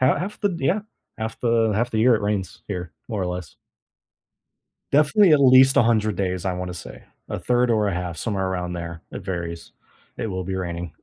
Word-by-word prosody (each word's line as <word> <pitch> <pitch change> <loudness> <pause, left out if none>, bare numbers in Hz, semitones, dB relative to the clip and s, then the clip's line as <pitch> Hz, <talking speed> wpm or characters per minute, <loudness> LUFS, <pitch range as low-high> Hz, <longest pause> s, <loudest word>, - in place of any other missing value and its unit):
Ha 130 +2 +4
half 200 +4 -5
the 205 -4 +1
yeah. 175 +8 +1 0.4
Half 110 0 -5
the 115 -2 +2
half 120 +4 0
the 110 - -1
year 120 +2 +5
it 110 - -1
rains 100 -6 -2
here, 90 -4 -5 0.2
more 105 -5 -2
or - - -1
less. 90 -4 -5 1.4
Definitely 155 +6 +5
at 150 - +6
least 130 0 +7
a - - +7
hundred 110 -3 +2
days, 90 -2 -2
I 95 - 0
wanna 90 0 -4
say, 85 - -10 0.3
a - - -2
third 125 0 +1
or 105 -2 +2
a 95 - -1
half, 90 -2 -4
somewhere 95 +1 -1
around 90 -1 -3
there, 85 -1 -6
it 95 - -8
varies. 85 -3 -5 0.5
It - - -2
will 95 -3 -3
be 95 +1 -3
raining. 85 -2 -4
100 Hz, 205 wpm, -23 LUFS, 90-120 Hz, 1.4 s, least